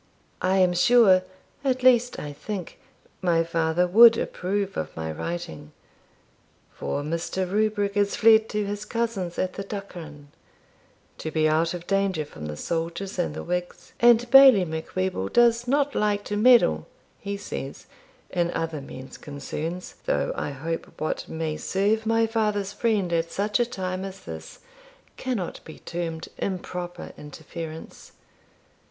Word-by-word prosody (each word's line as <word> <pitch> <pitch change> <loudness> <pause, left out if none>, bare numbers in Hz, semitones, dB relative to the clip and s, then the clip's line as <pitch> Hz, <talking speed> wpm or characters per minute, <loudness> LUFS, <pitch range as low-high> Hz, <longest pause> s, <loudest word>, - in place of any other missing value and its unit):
I 185 +1 +2
am 180 -1 +4
sure 195 0 +6 0.4
at 255 -2 0
least 245 -1 +4
I 145 -1 -6
think, 190 +3 -6 0.4
my 170 -3 +3
father 165 +1 +1
would 225 +5 +8
approve 195 +1 -2
of 80 0 -4
my 80 0 -3
writing; 80 - -6 1.0
for 145 - -3
Mr. 170 +4 -2
Rubrick 205 0 0
is 205 -1 +2
fled 220 -1 +5
to 210 -1 -1
his 205 +1 -4
cousin's 220 -7 -2
at 185 0 -1
the 200 - -5
Duchran, 170 -8 -8 0.9
to 160 - -4
to - - -9
be 155 0 +2
out 165 +3 +1
of 175 0 -8
danger 195 -5 0
from 75 - -9
the 75 0 -6
soldiers 170 - -3
and 170 -3 -1
the - - -5
Whigs, 180 0 -4
and 240 0 +5
Bailie 265 -8 +9
Macwheeble 160 - -3
does 240 0 +4
not 285 +1 +2
like 205 -1 +1
to 205 - -4
meddle 210 - +5 0.3
(he 200 0 -4
says) 140 -8 -7 0.5
in 175 -1 +1
other 160 -3 -3
men's 130 -1 -10
concerns, 155 +4 -6
though - - +1
I - - -3
hope 160 +4 -5
what 155 - -3
may 160 -1 -3
serve 210 +3 0
my 225 0 +3
father's 210 -3 -1
friend 205 -7 0
at 165 0 0
such 205 +4 0
a 240 - +2
time 185 -4 -3
as 195 0 -7
this - - -9 0.5
cannot 240 -9 -3
be 160 - -11
termed 165 -2 -5
improper 180 -2 -4
interference. 160 +2 -9
185 Hz, 145 wpm, -25 LUFS, 165-210 Hz, 1.0 s, Bailie